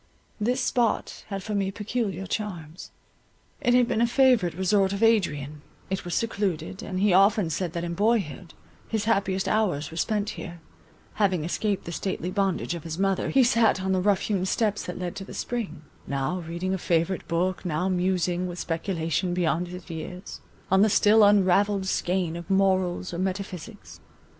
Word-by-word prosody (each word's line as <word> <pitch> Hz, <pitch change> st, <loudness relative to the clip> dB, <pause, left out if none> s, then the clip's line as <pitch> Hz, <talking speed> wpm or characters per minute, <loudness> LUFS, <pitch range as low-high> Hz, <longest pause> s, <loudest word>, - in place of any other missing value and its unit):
This 245 Hz, +5 st, 0 dB
spot 240 Hz, -2 st, 0 dB
had 195 Hz, -2 st, -5 dB
for 215 Hz, -, -4 dB
me 195 Hz, -1 st, 0 dB
peculiar 205 Hz, -2 st, -3 dB
charms. 180 Hz, -5 st, -5 dB, 0.7 s
It 245 Hz, -, +3 dB
had 250 Hz, -1 st, +4 dB
been 225 Hz, -, 0 dB
a 235 Hz, -, +4 dB
favourite 240 Hz, -, +3 dB
resort 190 Hz, +1 st, +2 dB
of 200 Hz, +3 st, -2 dB
Adrian; 150 Hz, -10 st, +1 dB, 0.3 s
it 190 Hz, -, -1 dB
was 175 Hz, -1 st, -3 dB
secluded; 195 Hz, -6 st, -2 dB
and 185 Hz, -1 st, -4 dB
he 200 Hz, -1 st, +3 dB
often 195 Hz, -2 st, +4 dB
said 170 Hz, +1 st, -2 dB
that 170 Hz, -, -3 dB
in 170 Hz, 0 st, -3 dB
boyhood, 195 Hz, -4 st, 0 dB, 0.3 s
his 220 Hz, -2 st, -1 dB
happiest 195 Hz, -3 st, +1 dB
hours 180 Hz, -10 st, 0 dB
were 165 Hz, -, -8 dB
spent 210 Hz, +3 st, 0 dB
here; 170 Hz, -1 st, -8 dB, 0.6 s
having 185 Hz, -6 st, +2 dB
escaped 200 Hz, +4 st, -1 dB
the 170 Hz, -, -5 dB
stately 180 Hz, 0 st, -3 dB
bondage 195 Hz, -3 st, 0 dB
of 170 Hz, -3 st, -6 dB
his 165 Hz, -1 st, -5 dB
mother, 195 Hz, 0 st, +1 dB
he 270 Hz, -, +5 dB
sat 230 Hz, -5 st, +3 dB
on 190 Hz, -, 0 dB
the 185 Hz, -1 st, +2 dB
rough 200 Hz, 0 st, +2 dB
hewn 195 Hz, -4 st, -1 dB
steps 210 Hz, 0 st, 0 dB
that 180 Hz, -, -5 dB
led 180 Hz, -1 st, -4 dB
to 195 Hz, -, -5 dB
the -, -, -10 dB
spring, 230 Hz, -10 st, -4 dB, 0.2 s
now 140 Hz, +6 st, -1 dB
reading 175 Hz, +3 st, -2 dB
a 190 Hz, -, -2 dB
favourite 170 Hz, +2 st, 0 dB
book, 180 Hz, +2 st, -1 dB
now 180 Hz, 0 st, -1 dB
musing, 180 Hz, -1 st, 0 dB
with 175 Hz, 0 st, -6 dB
speculation 170 Hz, +1 st, -1 dB
beyond 175 Hz, 0 st, 0 dB
his 180 Hz, 0 st, -9 dB
years, 180 Hz, +4 st, -7 dB, 0.3 s
on 190 Hz, 0 st, +5 dB
the 215 Hz, -, +5 dB
still 210 Hz, +1 st, +5 dB
unravelled 200 Hz, 0 st, +4 dB
skein 180 Hz, -2 st, 0 dB
of 170 Hz, +2 st, -8 dB
morals 190 Hz, -2 st, +1 dB
or 170 Hz, -, -4 dB
metaphysics. 190 Hz, +1 st, -5 dB
190 Hz, 175 wpm, -26 LUFS, 175-205 Hz, 0.7 s, he